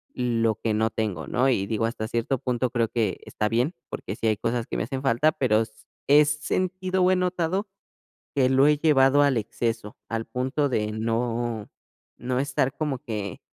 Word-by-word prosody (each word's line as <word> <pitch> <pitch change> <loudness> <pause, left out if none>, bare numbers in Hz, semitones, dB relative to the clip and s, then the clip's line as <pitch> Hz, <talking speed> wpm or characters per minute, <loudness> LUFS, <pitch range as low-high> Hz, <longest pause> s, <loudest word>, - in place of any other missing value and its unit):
lo 115 -3 +1
que 110 - 0
no 110 +1 +2
tengo, 105 -8 -3
¿no? 130 +2 +2
Y, 100 -6 +1
digo, 110 +1 0
hasta 115 -1 -3
cierto 120 +3 -1
punto, 125 0 -1
creo 115 -2 +1
que 115 -3 -1
está 105 - -2
bien, 125 +9 0
porque 95 - -5
sí 115 - -5
hay 110 -1 +2
cosas 115 +1 -1
que - - -5
me - - 0
hacen 130 +4 -4
falta, 135 +4 +3
pero 110 -5 +2
s 110 -1 -5 0.3
he 150 +2 +7
sentido 185 +5 -1
o 180 - +5
he - - +4
notado 180 +2 0 0.7
que 130 -2 +3
lo 135 +1 +5
he 150 0 +4
llevado 145 -2 +5
al 140 -3 +3
exceso, 115 0 -3
al 115 0 -2
punto 130 +5 -1
de 105 -4 0
no 115 0 -2 0.5
no 125 +1 -1
estar 135 0 0
como 150 -4 -1
que, 105 - -5
125 Hz, 190 wpm, -25 LUFS, 115-145 Hz, 0.7 s, he